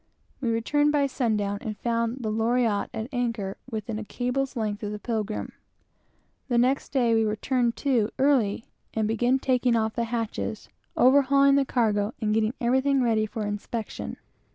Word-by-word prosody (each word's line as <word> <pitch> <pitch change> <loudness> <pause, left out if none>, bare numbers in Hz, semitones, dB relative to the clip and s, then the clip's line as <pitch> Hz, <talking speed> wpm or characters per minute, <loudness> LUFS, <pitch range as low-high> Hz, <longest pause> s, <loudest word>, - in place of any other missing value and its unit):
We 245 - 0
returned 290 +6 +2
by 290 -1 +2
sun 245 -5 0
down, 200 0 -2
and 215 -2 -5
found 235 +1 -1
the 215 - -1
Loriotte 225 -1 +1
at 220 - -4
anchor, 230 -6 -2
within 220 -1 -4
a - - -5
cable's 250 +5 -2
length 215 -2 -2
of 210 -1 -3
the 210 - -4
Pilgrim. 215 -1 -3 1.0
The 245 -3 +1
next 255 +3 +2
day 245 -4 +2
we 225 0 +3
were 215 -1 0
"turned 240 +1 0
to" 235 -6 +2
early, 255 -7 +2 0.3
and 220 -1 +1
began 240 +4 +2
taking 255 -2 +1
off 220 -1 0
the 235 - -1
hatches, 225 -2 -4 0.3
overhauling 275 +1 +5
the 275 0 +3
cargo, 215 -4 0
and 215 -2 0
getting 220 +2 +1
everything 265 +2 +2
ready 220 -2 +2
for 215 0 -4
inspection. 210 +2 -5
230 Hz, 170 wpm, -26 LUFS, 215-255 Hz, 1.0 s, overhauling